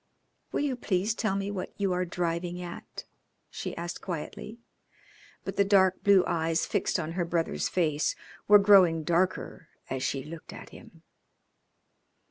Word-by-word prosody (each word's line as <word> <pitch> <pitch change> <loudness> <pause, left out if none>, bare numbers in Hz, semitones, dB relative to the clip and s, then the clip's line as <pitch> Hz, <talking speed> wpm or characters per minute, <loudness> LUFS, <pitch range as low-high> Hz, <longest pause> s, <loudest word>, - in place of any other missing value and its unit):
"Will - - -1
you 285 -3 0
please 205 -2 0
tell 220 -4 -1
me 200 +1 -2
what 190 -2 -5
you 195 -2 0
are 180 0 0
driving 175 0 -2
at?" 175 -1 -8 0.5
she - - -6
asked 170 0 -5
quietly. 185 +5 -6 0.9
But - - -5
the 200 - +5
dark 190 -2 +3
blue 200 -2 +6
eyes 165 0 0
fixed 200 -2 0
on 160 -1 -3
her 175 +1 -1
brother's 170 -1 -1
face 155 -4 0 0.3
were 210 - +9
growing 190 -5 +5
darker 175 +3 -1 0.2
as 130 -1 -2
she 135 0 -2
looked 160 +2 -10
at - - -10
him. - - -15
180 Hz, 150 wpm, -28 LUFS, 165-195 Hz, 0.9 s, were